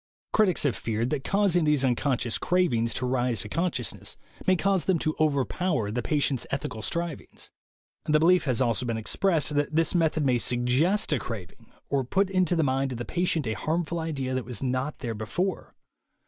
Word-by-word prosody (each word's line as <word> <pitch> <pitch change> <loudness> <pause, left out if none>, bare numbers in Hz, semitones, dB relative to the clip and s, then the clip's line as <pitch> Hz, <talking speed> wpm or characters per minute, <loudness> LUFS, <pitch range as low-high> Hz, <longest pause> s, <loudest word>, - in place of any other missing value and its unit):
Critics 205 -5 +3
have 140 -4 +1
feared 115 +2 -2
that 145 -3 -1
causing 195 -4 +2
these 150 -3 +2
uncon 130 +1 +1
scious 120 -2 -1
cravings 150 -11 +1
to 125 - -1
rise 125 -4 0
to 105 - -5
consciousness 150 - -2 0.3
may 185 - +5
cause 195 0 +1
them 190 -2 +2
to 155 0 -1
overpower 150 - 0
the 120 +3 -1
patient's 140 -1 0
ethical 125 -5 -4
strivings. 170 +4 -5 0.5
The 150 0 +3
belief 175 +2 +4
has 130 -2 +2
also 120 0 0
been 115 -1 -1
expressed 155 - +1
that 145 +1 0
this 165 0 +3
method 160 -3 +1
may 125 -2 +2
suggest 130 - +2
a 140 - +1
craving 105 -7 -8 0.2
or 140 -1 0
put 190 +9 0
into 185 -2 +2
the 165 - +2
mind 135 -1 0
of - - -5
the 120 - -5
patient 170 -4 0
a 110 - -1
harmful 165 +5 -2
idea 140 -5 -3
that 130 -1 -1
was 120 +1 -4
not 130 +3 -1
there 115 -2 -4
before. 120 - -3
145 Hz, 190 wpm, -27 LUFS, 125-170 Hz, 0.5 s, may